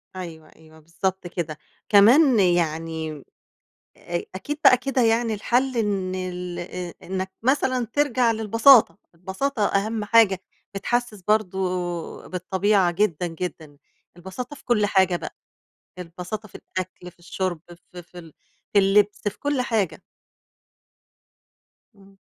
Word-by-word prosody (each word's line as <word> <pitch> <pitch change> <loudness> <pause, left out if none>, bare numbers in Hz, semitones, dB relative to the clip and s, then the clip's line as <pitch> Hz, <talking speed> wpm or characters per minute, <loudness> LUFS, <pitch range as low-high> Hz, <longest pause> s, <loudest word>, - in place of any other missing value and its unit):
أيوه، 165 -4 -8
أيوه، 160 0 -18
بالضبط 175 +4 -3
كده. 170 -3 -5 0.3
كمان 235 +5 +6
يعني 165 -3 0 0.9
أ 170 0 -4
أكيد 290 +10 -5
بقى 255 - +8
كده 260 +1 -1
يعني 225 0 +2
الحل 245 +5 0
إن 200 -4 -1
ال 180 -1 -5
آآ، 175 0 -6
إنّك 190 +1 -4
مثلًا 255 -1 +1
ترجع 255 -5 +2
للبساطة، 225 +1 +5 0.2
البساطة 205 +8 -2
أهم 210 +2 -1
حاجة 210 -4 +4 0.3
بتحسس 225 0 -2
برضه 210 -1 0 0.7
بالطبيعة 190 +1 +1
جدًا، 180 -2 0
جدًا، 165 -3 -6 0.4
البساطة 190 +10 -7
في - - -18
كل 215 -4 +2
حاجة 190 -3 +3
بقى، - - -8 0.6
البساطة 180 +5 -7
في - - -21
الأكل، 185 -1 -7
في - - -33
الشُرب 175 -1 -4 0.3
في 180 - -9
في 175 +1 -13
ال 165 -3 -14 0.4
في 205 - +6
اللبس 200 +1 +3
في 205 - -4
كل 290 -2 0
حاجة. 220 -7 -1 1.9
إمم. 195 -1 -20
195 Hz, 125 wpm, -23 LUFS, 175-225 Hz, 1.9 s, بقى